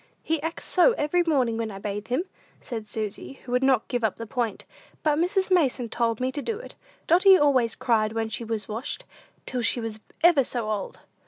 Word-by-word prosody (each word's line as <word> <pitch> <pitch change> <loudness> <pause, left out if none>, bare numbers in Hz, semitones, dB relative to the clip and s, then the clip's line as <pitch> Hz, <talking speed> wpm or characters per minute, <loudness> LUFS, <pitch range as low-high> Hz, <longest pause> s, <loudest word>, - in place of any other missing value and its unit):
"He 320 -2 -1
acts 325 +2 -4
so 395 +7 +5
every 325 0 +1
morning 255 -7 +2
when 225 -1 -2
I 195 - -7
bathe 205 +1 -5
him," 255 +7 0 0.4
said 225 -4 -6
Susy, 215 +3 -5
who 245 - -8
would 250 0 +2
not 265 -4 +3
give 245 -2 -2
up 215 -4 +1
the 230 - -6
point; 230 -2 -3 0.4
"but 300 -1 +2
Mrs. 375 +2 +1
Mason 275 -9 +2
told 230 -1 0
me 255 +1 0
to 290 - -4
do 440 +8 -3
it! 485 - -10 0.3
Dotty 375 +3 +6
always 260 -7 +3
cried 220 -3 +1
when 225 0 -1
she 220 +2 -4
was 220 -3 -3
washed, 225 +5 -4 0.4
till 250 -1 -2
she 230 +1 +2
was 225 -2 -5 0.2
ever 335 -5 +6
so 235 -3 -2
old." 205 -2 -4
245 Hz, 210 wpm, -26 LUFS, 225-300 Hz, 0.4 s, Dotty